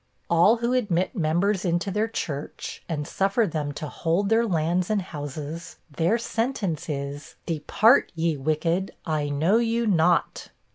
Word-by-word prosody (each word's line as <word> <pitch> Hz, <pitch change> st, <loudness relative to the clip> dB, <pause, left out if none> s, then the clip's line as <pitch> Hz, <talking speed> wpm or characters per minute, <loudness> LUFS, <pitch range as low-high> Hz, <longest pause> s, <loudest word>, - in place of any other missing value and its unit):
All 170 Hz, +7 st, +6 dB
who 235 Hz, +2 st, 0 dB
admit 200 Hz, -5 st, 0 dB
members 185 Hz, +3 st, +1 dB
into 175 Hz, +2 st, 0 dB
their 210 Hz, +3 st, 0 dB
church, 150 Hz, -10 st, -5 dB
and 150 Hz, -3 st, -3 dB
suffer 195 Hz, +6 st, +1 dB
them 150 Hz, -5 st, -3 dB
to 150 Hz, -, -5 dB
hold 170 Hz, +7 st, 0 dB
their 230 Hz, +1 st, +3 dB
lands 175 Hz, 0 st, 0 dB
and 215 Hz, -1 st, +2 dB
houses, 150 Hz, 0 st, -7 dB, 0.2 s
their 175 Hz, +9 st, +2 dB
sentence 225 Hz, -, -2 dB
is, 140 Hz, 0 st, -5 dB
"Depart, 180 Hz, -, +3 dB
ye 165 Hz, -1 st, 0 dB
wicked, 160 Hz, +6 st, -1 dB
I 155 Hz, -3 st, -1 dB
know 160 Hz, +9 st, +2 dB
you 235 Hz, 0 st, +1 dB
not." 175 Hz, -4 st, +2 dB
170 Hz, 145 wpm, -25 LUFS, 155-210 Hz, 0.2 s, All